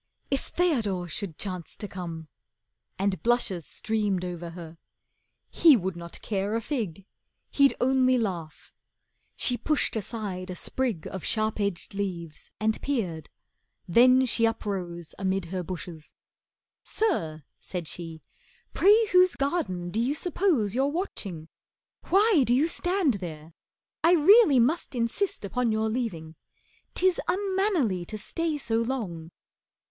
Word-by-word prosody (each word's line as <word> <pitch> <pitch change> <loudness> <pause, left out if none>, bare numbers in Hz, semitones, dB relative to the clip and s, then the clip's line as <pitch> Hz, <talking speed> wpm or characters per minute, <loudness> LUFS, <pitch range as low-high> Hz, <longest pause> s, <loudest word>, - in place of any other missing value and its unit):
If 275 - -1
Theodore 220 - 0
should 175 -1 -5
chance 185 -4 -4
to 205 - -4
come, 170 -4 -7 0.7
and 195 -3 0
blushes 225 -8 0
Streamed 205 -4 -1
over 175 -1 -5
her. 165 -1 -10 0.7
He 315 -6 +6
would 190 -2 -3
not 170 0 -9
care 200 0 -1
a 230 - 0
fig, 210 - -4 0.5
He'd 280 -1 +4
only 255 0 +3
laugh. 175 -9 -4 0.6
She 245 - 0
pushed 305 -2 0
aside 200 -4 -4
a 180 - -4
sprig 230 -4 -2
Of 190 - -6
sharp 215 -1 0
edged 200 -3 -2
leaves 175 -6 -5
and 220 0 0
peered, 185 - -2 0.6
then 255 +7 +6
she 230 -2 +3
uprose 180 -7 -4
Amid 190 -1 0
her 185 - -1
bushes. 170 -3 -8 0.7
"Sir," 160 - -1 0.2
said 175 -4 -5
she, 165 -1 -7 0.5
"pray 425 +4 +5
whose 365 0 +5
Garden 205 - -1
do 220 - -1
you 255 +5 +1
suppose 320 - +1
you're 265 +3 +2
watching? 205 - -4 0.6
Why 400 -3 +5
Do 240 0 +2
you 290 +5 +3
stand 355 - +1
there? 160 -2 -8 0.5
I 335 - +6
really 345 - +7
must 275 +4 +1
insist 235 - -1
Upon 240 +3 0
your 220 0 0
leaving. 175 -10 -4 0.6
'Tis 370 -1 +3
unmannerly 375 - +1
To 215 - -6
stay 320 +8 -2
so 230 -5 0
long." 205 -10 -3
215 Hz, 130 wpm, -27 LUFS, 180-275 Hz, 0.7 s, really